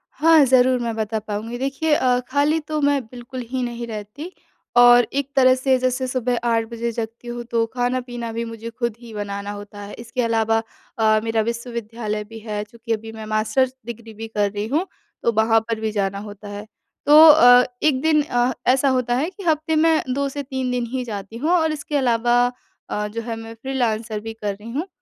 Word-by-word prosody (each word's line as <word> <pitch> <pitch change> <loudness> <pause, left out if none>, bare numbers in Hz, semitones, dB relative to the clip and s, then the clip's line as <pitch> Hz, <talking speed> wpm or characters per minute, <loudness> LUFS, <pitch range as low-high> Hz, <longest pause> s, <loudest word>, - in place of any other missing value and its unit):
हाँ, 320 +1 +6
ज़रूर 255 0 +4
मैं 235 -2 -2
बता 220 0 -2
पाऊँगी। 220 +3 -5
देखिए 275 +4 0
अ, 250 -3 +3
खाली 290 +4 +2
तो 305 0 -4
मैं 285 -1 +2
बिल्कुल 245 +2 -8
ही 260 -1 -2
नहीं 240 -1 -4
रहती। 220 - -7 0.5
और 245 -1 +7
एक 280 0 -1
तरह 255 -1 +6
से 260 0 +2
जैसे 255 +1 0
सुबह 250 -1 -1
8 225 -1 +2
बजे 235 0 -3
जगती 230 +1 -6
हूँ 240 0 -5
तो 230 -1 +2
खाना-पीना 245 -1 -2
भी 230 +1 -2
मुझे 230 0 -7
खुद 235 -1 -3
ही 235 -2 -12
बनाना 200 -1 -4
होता 205 0 -9
है। 200 0 -8
इसके 240 +2 -3
अलावा 225 -1 +1 0.4
अ, 215 -1 +4
मेरा 225 -1 +1
विश्वविद्यालय 230 -2 -4
भी 225 +1 -11
है, 210 -1 -4
क्योंकि 230 +2 -5
अभी 225 +1 -5
मैं 220 -1 -8
मास्टर्स 220 +5 +1
डिग्री 230 -1 -8
भी 225 +1 -7
कर 205 -2 0
रही 205 +1 -3
हूँ 320 +9 0 0.4
तो 235 - +3
वहाँ 225 +1 +3
पर 225 -1 -1
भी 220 -1 -2
जाना 200 -1 -1
होता 205 0 -10
है। 205 +1 -7 0.4
तो 295 - +6
अ, 250 -5 +8 0.2
1 275 -4 +3
दिन 310 0 +3
अ, 245 -3 +1 0.2
ऐसा 265 +2 +4
होता 250 -2 +1
है 295 +8 0
कि 395 0 -11
हफ़्ते 315 -1 +1
में 315 0 +4
2 280 +1 0
से 285 +1 -5
3 260 -1 -3
दिन 245 -1 -1
ही 255 -1 -1
जाती 210 -1 -7
हूँ। 305 +7 -1
और 320 -3 +3
इसके 295 0 -5
अलावा 240 -1 +3 0.4
अ, 210 0 -2
जो 225 +2 -5
है 230 0 -4
मैं 225 0 -8
फ्रीलांसर 230 -5 -1
भी 225 +1 -7
कर 210 -2 -3
रही 210 +3 -11
हूँ। 305 +10 -3
235 Hz, 205 wpm, -22 LUFS, 220-260 Hz, 0.5 s, अ